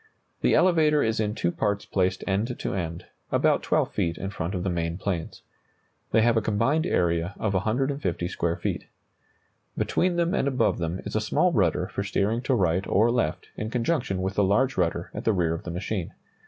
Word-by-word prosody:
The - - +3
elevator 155 -5 +4
is 110 0 0
in 105 -1 0
two 85 - 0
parts 100 +2 -1
placed 95 -1 0
end 105 +6 -1
to - - -3
end, 85 -3 -4 0.3
about - - +3
12 - - +1
feet 85 -1 -1
in 95 - -4
front 95 -1 -3
of 90 - -2
the 95 - 0
main 85 -1 -2
planes. 95 -4 -4 0.7
They 110 - +4
have 120 0 +4
a 110 - +3
combined 115 - +1
area 85 - 0
of 105 -2 -1
150 110 - 0
square 85 -2 -1
feet. 85 - -3 0.9
Between 180 0 +1
them 170 0 +1
and - - +1
above 125 -9 +1
them 85 +2 -2
is - - -5
a 110 - +2
small 180 +11 +2
rudder 90 -3 +2
for - - -4
steering 105 +3 0
to 130 0 +1
right 90 -2 +1
or 110 +4 +3
left 115 -11 -1
in 110 - -4
conjunction 120 - -1
with 95 - -1
the 105 - +2
large 115 +8 +2
rudder 85 -1 -1
at - - -5
the 110 - +2
rear 85 -4 +1
of 85 - -6
the - - -4
machine. 90 +1 -3
100 Hz, 200 wpm, -26 LUFS, 90-120 Hz, 0.9 s, elevator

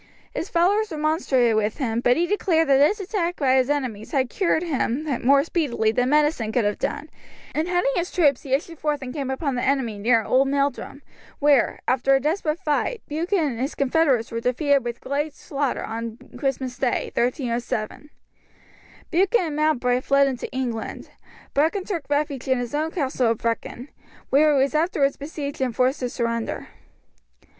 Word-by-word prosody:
His 350 - -4
followers 400 +6 +2
remonstrated 300 -7 +1
with 215 0 0
him, 235 -5 -1
but 245 +2 +3
he 345 - +2
declared 340 -5 +1
that 270 - +6
this 350 +10 +4
attack 360 -3 -2
by 270 -5 +2
his 260 0 +2
enemies 255 -8 -2
had 260 -3 +1
cured 345 -4 +1
him 285 -4 -1 0.2
more 275 +2 +5
speedily 275 -10 0
than 250 +3 +1
medicine 295 -6 +2
could 235 -2 +1
have 205 0 -1
done, 290 +2 -3 0.5
and 310 +3 -1
heading 355 -5 +1
his 350 +1 -1
troops 290 -8 +2
he 270 - -9
issued 325 +3 -5
forth 295 -2 -1
and 250 -1 -6
came 275 -3 -3
upon 270 +1 -2
the 245 - -2
enemy 255 -6 0
near 230 +1 +3
Old 265 +4 +3
Meldrum, 280 0 -2 0.3
where, 285 -4 +3
after 265 +2 +3
a - - +3
desperate 305 +2 -1
fight, 375 +7 -1
Buchan 335 +7 0
and 285 -9 -1
his 270 +4 -2
confederates 275 -4 +1
were 230 - -2
defeated 275 +3 +2
with 240 -1 -5
great 290 +2 -2
slaughter 280 -2 -2
on 230 0 -5 0.2
Christmas 260 -2 -3
day, 255 -2 0
1307. 240 0 -2 1.0
Buchan 385 +7 +3
and 305 -3 -4
Mowbray 255 -5 +1
fled 275 +1 +3
into 255 -2 -4
England. 245 -4 -4 0.4
Brechin 325 +7 +1
took 340 -9 -4
refuge 285 -3 -1
in 260 -1 +2
his 245 +1 -4
own 310 +2 0
castle 265 -7 0
of 225 - +1
Brechin, 235 +3 -3 0.4
where 295 +2 +5
he 265 - +4
was 275 - -1
afterwards 305 -3 +1
besieged 285 -1 -6
and 250 -3 -1
forced 255 +3 +2
to 250 - -2
surrender. 230 -2 -3
275 Hz, 175 wpm, -23 LUFS, 250-310 Hz, 1.0 s, that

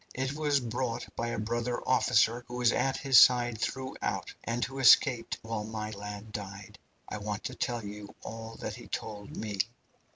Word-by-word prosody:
It 130 +1 -1
was 145 -2 +2
brought 120 0 -3
by 115 - -2
a 115 0 -2
brother 120 +3 -1
officer 120 -1 +3
who 120 - -7
was 120 -1 +3
at 135 +1 +1
his 135 -2 +7
side 120 -3 +5
throughout, 130 +3 -3
and 120 +1 -1
who 135 +2 -7
escaped 125 -2 +5
while 110 -1 -3
my 110 0 -4
lad 105 +1 -7
died. 100 -1 -7 0.3
I 105 - -5
want 105 0 -4
to 125 - -4
tell 120 -3 -2
you 105 0 -8
all 115 0 -7
that 105 - -4
he 120 - -11
told 105 -2 -6
me. 105 -3 -4
115 Hz, 175 wpm, -30 LUFS, 105-125 Hz, 0.3 s, his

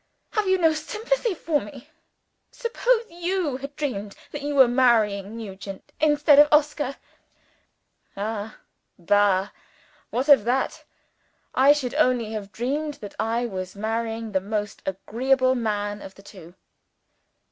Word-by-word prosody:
Have 430 -3 0
you 375 0 +4
no 325 -3 +3
sympathy 440 +7 -2
for 310 -3 0
me? 235 +5 -11 0.6
Suppose 475 0 0
you 345 -4 -2
had 275 +2 -8
dreamed 210 -10 -4 0.2
that 295 - -6
you 290 0 -3
were 265 -2 +7
marrying 225 -4 +2
Nugent 195 -3 -9
instead 295 -1 +5
of 295 - +8
Oscar?" 295 -2 +2 1.2
"Ah, 215 +1 -4 0.4
bah! 200 +1 +2 0.6
what 255 +4 -2
of 280 -7 +7
that? 250 +4 -1 0.7
I 270 +2 +6
should 280 -4 0
only 250 -7 +2
have 205 -3 -6
dreamed 290 +6 -2
that 205 -3 -10
I 230 +2 0
was 185 -4 -5
marrying 225 +1 -3
the 190 -2 +1
most 210 +1 -4
agreeable 255 +7 +1
man 205 -4 -2
of 190 - -10
the 195 - -16
two." 180 -4 -13
240 Hz, 135 wpm, -24 LUFS, 205-295 Hz, 1.2 s, of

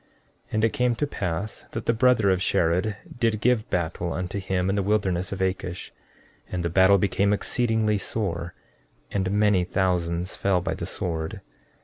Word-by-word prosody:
14:4 - - -19
And 110 +1 +3
it 115 - 0
came 125 -1 +1
to 145 - 0
pass 100 - -4
that 110 - -4
the 115 - +3
brother 115 -4 +4
of 95 -1 +1
Shared 90 +5 +1 0.2
did 115 -3 +1
give 120 -1 +1
battle 85 0 -1
unto 95 +2 -3
him 95 -1 -1
in 95 - +1
the 100 - +1
wilderness 95 -2 0
of 95 -1 -2
Akish; 90 -1 -3 0.6
and 90 -1 -2
the 85 - -1
battle 95 +2 +6
became 100 +1 +1
exceedingly 110 -1 +1
sore, 90 -6 -3 0.6
and 95 -2 0
many 105 -2 +3
thousands 90 -1 0
fell 95 -2 +1
by 90 - -2
the - - -5
sword. 80 -3 -3
95 Hz, 170 wpm, -25 LUFS, 90-105 Hz, 0.6 s, battle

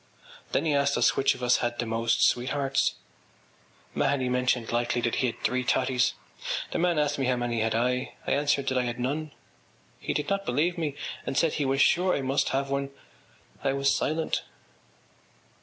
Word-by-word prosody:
Then - - +1
he 155 - +2
asked 140 0 +2
us - - +3
which 135 - +2
of 125 - -9
us 125 0 +4
had 120 0 -2
the 120 - -1
most 115 0 +2
sweethearts. 135 +2 0 1.0
Mahony 130 -3 +1
mentioned 125 -2 0
lightly 120 +1 0
that 120 -1 0
he 130 - +2
had 115 - -5
three 125 0 +1
totties. 125 0 +1 0.6
The - - -1
man 175 -1 +2
asked 145 -1 +1
me 135 - +1
how 130 - +2
many 120 -1 -1
had 110 0 0
I. 125 +2 0
I - - -2
answered 140 -1 +1
that 130 -1 +1
I 125 - 0
had 120 0 -4
none. 145 +5 -2 0.7
He - - -3
did 150 - -1
not 195 0 0
believe 160 +5 0
me 155 -5 -3 0.3
and 135 - -3
said 165 -2 +3
he 145 - -1
was 135 +1 +1
sure 180 +1 +3
I - - -1
must 135 +2 +1
have 135 +1 -1
one. 140 0 -1 0.7
I 135 - +1
was 140 0 +2
silent. 160 +1 -1
135 Hz, 190 wpm, -27 LUFS, 125-145 Hz, 1.0 s, us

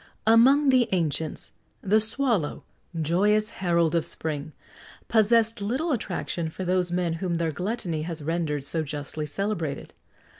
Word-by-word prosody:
Among 260 +6 +6
the 250 -3 +4
ancients, 160 -3 -1 0.3
the 210 +2 +4
swallow 220 - 0 0.4
joyous 205 +7 +2
herald 170 -3 +2
of 170 -2 +2
spring 155 -1 -2 0.6
possessed 225 0 +3
little 260 +11 -1
attraction 180 - -2
for 185 +4 -6
those 180 -1 +1
men 175 -2 0
whom 180 -3 -1
their 165 -1 0
gluttony 180 -1 -3
has 160 -1 -5
rendered 155 -3 -1
so 160 +3 -2
justly 150 0 -5
celebrated. 165 -4 -3
175 Hz, 135 wpm, -26 LUFS, 160-215 Hz, 0.6 s, Among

